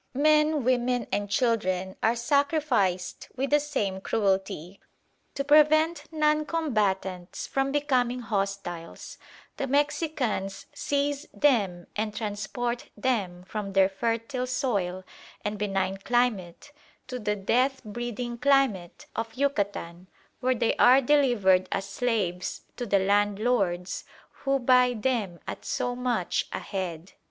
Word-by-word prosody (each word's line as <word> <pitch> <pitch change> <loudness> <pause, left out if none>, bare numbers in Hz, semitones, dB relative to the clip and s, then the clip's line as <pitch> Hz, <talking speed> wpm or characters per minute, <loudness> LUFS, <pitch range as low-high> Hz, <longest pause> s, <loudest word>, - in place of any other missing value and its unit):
"Men, 300 0 +3
women, 245 -1 +1
and 205 0 -1
children 190 -5 0
are 225 +2 +3
sacrificed 265 - 0
with 270 +2 -2
the 295 - +6
same 205 -10 -2
cruelty. 195 -4 -1 0.6
To 275 - -1
prevent 305 +2 +4
non 305 -1 +2
combatants 195 - -1
from 270 0 0
becoming 255 -4 +1
hostiles, 195 -6 -4 0.4
the 275 - -2
Mexicans 285 - -1
seize 285 0 -1
them 200 -11 +2
and 210 0 -2
transport 235 +3 -3
them 195 -9 -1
from 195 +1 -5
their 190 -1 +5
fertile 230 +5 -2
soil 200 -8 -1 0.4
and 210 0 -2
benign 195 -2 -1
climate 225 -1 -1 0.3
to 255 -1 -5
the 210 -2 -1
death 255 +7 +1
breeding 240 +2 -5
climate 255 -10 +1
of 225 0 -4
Yucatan, 200 -10 -2 0.3
where 255 0 +1
they 230 -1 +1
are 255 +2 +7
delivered 240 -10 +3
as 195 0 -1
slaves 200 -5 -2
to 245 - -4
the 200 - +3
landlords, 200 -2 +1 0.3
who 275 0 -1
buy 250 -1 +4
them 215 -7 -1
at - - -6
so 245 0 -2
much 245 -7 -1
a - - -2
head. 180 -3 -5
230 Hz, 120 wpm, -27 LUFS, 195-270 Hz, 0.6 s, are